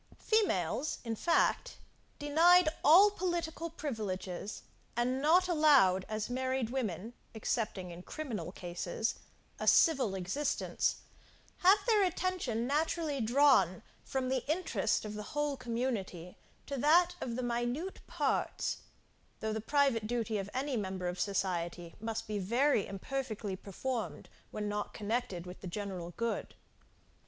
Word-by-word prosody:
Females, 300 - +1
in 230 -2 -3
fact, 345 - +1 0.4
denied 325 +4 +5
all 380 +7 +8
political 340 -3 -2
privileges, 210 - -4 0.3
and 250 +2 +1
not 350 +5 +5
allowed, 280 - +4
as 215 -1 -2
married 260 -1 -1
women, 225 -4 -3 0.2
excepting 210 -4 -2
in 170 +1 -9
criminal 215 - -5
cases, 175 +4 -3 0.5
a - - -3
civil 265 -11 +5
existence, 195 +11 -1 0.6
have 380 +3 +6
their 435 -4 +4
attention 360 -11 -1
naturally 300 0 0
drawn 235 - +4 0.2
from 260 -1 -2
the 260 -2 0
interest 355 -8 0
of 210 - -5
the 210 - -5 0.2
whole 295 -1 +1
community 230 -8 -3 0.3
to 280 - -4
that 340 +6 +5
of 235 - -3
the 255 - -2
minute 240 +9 -2
parts, - - -1 0.6
though 220 0 -2
the 220 - -2
private 265 -4 +2
duty 225 -2 -1
of 195 0 -5
any 270 +1 -2
member 190 -4 -3
of 180 +1 -4
society 175 -3 -2
must 225 0 -3
be 210 -2 -3
very 235 +4 +2
imperfectly 215 -1 -4
performed, 225 +5 -4 0.2
when 210 -1 -4
not 205 0 -3
connected 210 -4 -2
with 180 +1 -10
the 190 - -6
general 185 -2 -5
good. 230 0 -2
235 Hz, 130 wpm, -32 LUFS, 200-295 Hz, 0.6 s, all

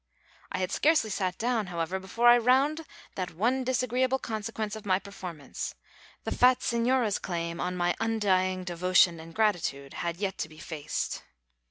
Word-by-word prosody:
I - - -2
had 185 0 -1
scarcely 295 -9 +3
sat 185 -2 -1
down, 230 -3 0
however, 175 +2 -2
before 210 +6 +1
I 240 0 +8
round 275 +6 +2 0.3
that 180 -3 -4
one 245 +8 +1
disagreeable 255 +1 +1
consequence 220 -2 -4
of 220 - -8
my 185 -2 +2
performance 180 -7 -7 0.5
the - - -3
fat 250 0 +4
señora's 235 -2 +1
claim 170 -1 -3
on 180 0 -2
my 175 0 +1
undying 185 -4 +1
devotion 175 -1 +3
and 165 +1 -10
gratitude 170 -10 0
had 170 -1 -2
yet 195 0 -3
to - - -3
be 155 - -15
faced. 155 -1 -4
200 Hz, 160 wpm, -28 LUFS, 175-235 Hz, 0.5 s, I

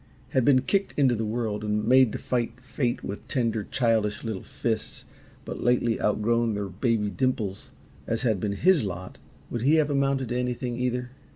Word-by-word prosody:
had 130 - +2
been 130 0 +5
kicked 200 +6 0
into 135 -4 +4
the 115 -1 -1
world 110 -2 -2
and 105 0 0
made 130 -2 +6
to - - -3
fight 120 -1 -2
fate 125 -1 -2
with 100 - -6
tender, 115 -5 0
childish 110 -4 0
little 110 -5 -3
fists 110 -2 -3 0.4
but - - -6
lately 120 -1 +2
outgrown 115 +1 +1
their 100 -1 -3
baby 105 +2 0
dimples, 105 -2 -2 0.4
as 115 +2 -1
had 110 -6 +2
been 100 +1 -1
HIS 175 - +4
lot, 95 -2 -6 0.3
would 120 - -2
he 145 +6 +4
have 155 -2 +2
amounted 135 -2 +1
to 120 - -2
anything, 125 0 -2
either? 125 0 -2
120 Hz, 180 wpm, -26 LUFS, 105-130 Hz, 0.4 s, made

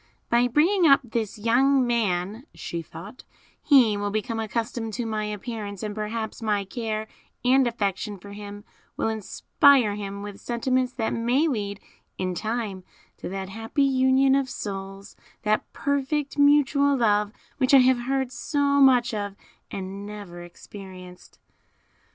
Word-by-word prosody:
"By 240 +1 +4
bringing 335 - +3
up 275 -1 +6
this 225 -3 -3
young 255 +5 +3
man," 220 - -1
she 170 - -5
thought, 165 - -11 0.4
"he 250 -8 +5
will 205 0 -2
become 220 +2 -2
accustomed 225 0 -3
to 240 +2 -3
my 215 -1 -2
appearance, 210 -1 -6
and 210 -1 -3
perhaps 220 +2 -4
my 210 -3 0
care 220 0 -4 0.4
and 260 0 +4
affection 205 -2 -2
for 200 +2 -12
him 205 0 -9 0.3
will - - 0
inspire 220 +2 +3
him 200 -1 -6
with 205 -1 -8
sentiments 255 +1 0
that 225 -3 -2
may 245 +7 +1
lead 205 -7 -3 0.4
in 185 -1 -2
time 215 -1 -3 0.3
to - - -6
that 190 0 -5
happy 225 +7 -1
union 265 0 +3
of 270 -1 +1
souls, 195 -2 -7 0.3
that 215 0 0
perfect 280 0 -1
mutual 285 -1 +4
love, 210 -3 +2 0.3
which 270 +1 +4
I 260 -2 +7
have 255 -1 +4
heard 265 +1 -1
so 280 0 +1
much 250 -3 +5
of 205 -2 -3 0.3
and 195 +1 -6
never 200 -4 -9
experienced." 180 0 -12
225 Hz, 145 wpm, -25 LUFS, 205-260 Hz, 0.4 s, I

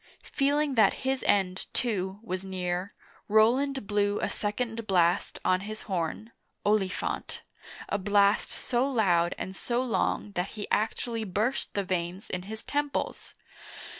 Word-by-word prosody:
Feeling 285 +1 +2
that 215 -5 +5
his 265 0 0
end, 190 -2 +2
too, 195 -5 -1
was 185 -4 -3
near, 185 0 -3 0.3
Roland 245 +5 +3
blew 205 0 +1
a - - -1
second 225 +1 -3
blast 175 -2 +2
on 185 - +4
his 215 +3 -7
horn 190 +4 -3 0.2
(" - - -47
Oli 205 -2 +3
phant - - -4
*') - - -17
— - - -14
a 205 - 0
blast 200 +1 +3
so 240 0 0
loud 180 -9 +2
and 190 - -5
so 240 +5 -1
long 210 -2 0
that 180 -1 -3
he 205 - -4
actually 225 +1 0
burst 215 +7 -1
the 200 - +1
veins 180 +1 -3
in 180 - -2
his 220 0 -6
temples 290 0 -2
205 Hz, 155 wpm, -29 LUFS, 185-230 Hz, 0.3 s, that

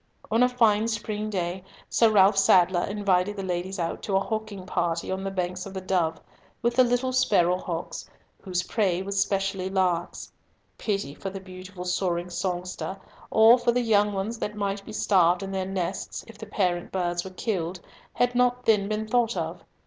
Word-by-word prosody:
On 225 +2 +3
a 250 - +5
fine 225 -3 +3
spring 215 -1 -3
day 180 -2 -3 0.2
Sir 230 - +4
Ralf 200 -1 +5
Sadler 185 -2 +4
invited 200 -1 +1
the 195 - -5
ladies 185 +1 -3
out 165 -2 -3
to 195 - -2
a - - +5
hawking 215 -2 -4
party 170 -2 -1
on 190 0 -3
the 195 - -2
banks 180 0 -3
of 195 - -10
the - - -2
Dove, 175 -4 0 0.4
with 235 0 +1
the 255 - +6
little 245 +1 0
sparrow 190 -9 +3
hawks, 170 -2 -5 0.3
whose 180 -2 -2
prey 190 -4 0
was 200 0 -2
specially 195 -1 -1
larks. 180 -3 -1 0.5
Pity 195 -10 -2
for 195 - -6
the 195 0 -7
beautiful 185 0 -9
soaring 180 -1 -1
songster, 180 +1 -3 0.3
or 225 +3 +7
for 240 - +2
the 245 +1 +1
young 210 -3 +3
ones 205 +4 -3
that 210 - -3
might 200 -1 -2
be 215 - -10
starved 180 -3 +3
in 195 - -5
their 190 -1 -2
nests, 190 -1 -3
if 225 - -13
the 215 +1 -9
parent 180 -4 -1
birds 175 -2 -1
were 190 - -7
killed, 185 -3 -3 0.3
had 245 0 +1
not 250 0 +2
then 210 -3 +3
been 215 0 -2
thought 240 0 +1
of. - - -4
195 Hz, 185 wpm, -26 LUFS, 180-215 Hz, 0.5 s, or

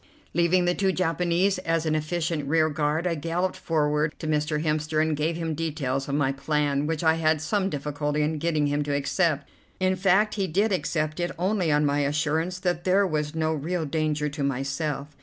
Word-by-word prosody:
Leaving 175 +2 +3
the 175 - +2
two 190 +1 +1
Japanese 180 +2 +1
as 165 -2 -1
an 155 - +1
efficient 155 -1 -1
rearguard, 155 +1 +1
I 175 - +1
galloped 170 +4 -1
forward 150 -1 0
to - - -7
Mr. 150 0 0
Hemster, 155 0 0
and 155 0 +2
gave 155 +3 -1
him 165 -1 -2
details 145 -4 -2
of 140 - 0
my 145 -2 +2
plan, 145 +1 0
which 160 0 -2
I 160 -1 +5
had 155 -1 +2
some 195 +5 0
difficulty 150 0 -2
in 155 +1 -1
getting 155 -2 +1
him 145 0 0
to 145 -1 -1
accept. 145 0 0 0.3
In 185 0 +2
fact 195 +3 +3
he 195 -3 -1
did 200 +6 +1
accept 155 -4 -1
it 175 0 0
only 185 -2 +1
on 150 0 +3
my 145 0 +1
assurance 150 +5 0
that 175 -2 -1
there 190 +2 +3
was 150 -3 -2
no 160 0 +1
real 160 +3 -2
danger 150 0 -1
to 150 0 -5
myself. 140 +2 -2
155 Hz, 195 wpm, -26 LUFS, 150-175 Hz, 0.3 s, I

